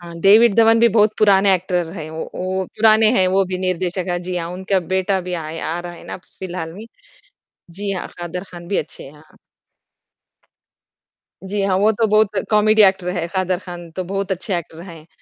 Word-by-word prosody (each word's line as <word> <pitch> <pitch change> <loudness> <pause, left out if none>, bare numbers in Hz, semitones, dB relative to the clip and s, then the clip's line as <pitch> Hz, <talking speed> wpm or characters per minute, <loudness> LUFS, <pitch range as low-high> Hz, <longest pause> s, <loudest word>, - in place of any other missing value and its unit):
हाँ, 170 -1 -11
डेविड 210 +4 +6
धवन 225 0 +5
भी 235 - +6
बहुत 215 0 +3
पुराने 200 -2 +5
एक्टर 180 -2 -2
है, 155 -5 -7
वो 160 0 -5
वो 185 +1 -2
पुराने 220 0 +5
हैं 185 - +4
वो 195 +1 +2
भी 185 0 -4
निर्देशक 185 0 -2
है। 175 0 -1
जी, 180 0 -4
हाँ 170 -1 -3
उनका 190 +1 -1 0.2
बेटा 190 +1 +1
भी 180 0 -6
आया 160 +1 -5
आ - - -4
रहा 175 0 -8
है 170 - -13
ना - - -6
अब - - -10 0.2
फ़िलहाल 175 -3 -6
में। 210 - -9 0.9
जी 200 +3 -4
हाँ, 185 - -4
कादर 175 +1 -5
ख़ान 175 -1 -10
भी 200 - -1
अच्छे 150 - -5
हैं। 135 - -11
हाँ। 150 +1 -21 2.1
जी, 205 +1 -2
हाँ 190 -1 +1
वो 210 +2 +4
तो 225 +1 +1
बहुत 215 -1 +3 0.2
कॉमेडी 215 0 +4
एक्टर 190 -2 +3
है, 175 -2 -2
कादर 185 -1 0
ख़ान 175 -2 -10
तो 185 +3 -5
बहुत 195 +2 -4
अच्छे 185 +1 -3
एक्टर 165 -1 -10
है। 160 -1 -13
185 Hz, 205 wpm, -19 LUFS, 175-200 Hz, 2.1 s, डेविड